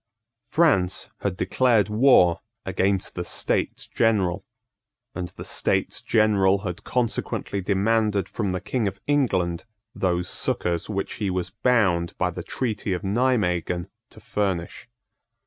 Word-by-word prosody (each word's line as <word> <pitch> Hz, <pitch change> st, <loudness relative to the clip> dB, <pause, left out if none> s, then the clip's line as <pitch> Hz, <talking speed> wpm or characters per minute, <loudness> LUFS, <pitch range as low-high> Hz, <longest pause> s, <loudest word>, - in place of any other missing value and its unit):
France 130 Hz, -, +2 dB
had 95 Hz, -2 st, -2 dB
declared 115 Hz, -5 st, +2 dB
war 105 Hz, -6 st, +4 dB, 0.2 s
against 95 Hz, 0 st, 0 dB
the 90 Hz, -, -3 dB
States 85 Hz, -, -1 dB
General; 95 Hz, -4 st, +1 dB, 0.7 s
and 90 Hz, 0 st, -4 dB
the -, -, -8 dB
States -, -, 0 dB
General 100 Hz, -3 st, +3 dB
had 90 Hz, -3 st, -5 dB
consequently 115 Hz, -4 st, -2 dB
demanded 105 Hz, +1 st, +1 dB
from 100 Hz, -4 st, -2 dB
the 90 Hz, +1 st, -3 dB
King 110 Hz, +2 st, -1 dB
of 100 Hz, 0 st, -5 dB
England 95 Hz, -, +1 dB, 0.3 s
those 90 Hz, -1 st, 0 dB
succours 85 Hz, 0 st, 0 dB
which 100 Hz, -2 st, -3 dB
he 100 Hz, -, 0 dB
was 90 Hz, 0 st, -2 dB
bound 95 Hz, -9 st, +1 dB
by -, -, 0 dB
the -, -, -6 dB
treaty 105 Hz, -6 st, -2 dB
of 90 Hz, -, -4 dB
Nimeguen 95 Hz, -6 st, 0 dB, 0.2 s
to -, -, -15 dB
furnish. 95 Hz, 0 st, -3 dB
100 Hz, 130 wpm, -24 LUFS, 90-110 Hz, 0.7 s, war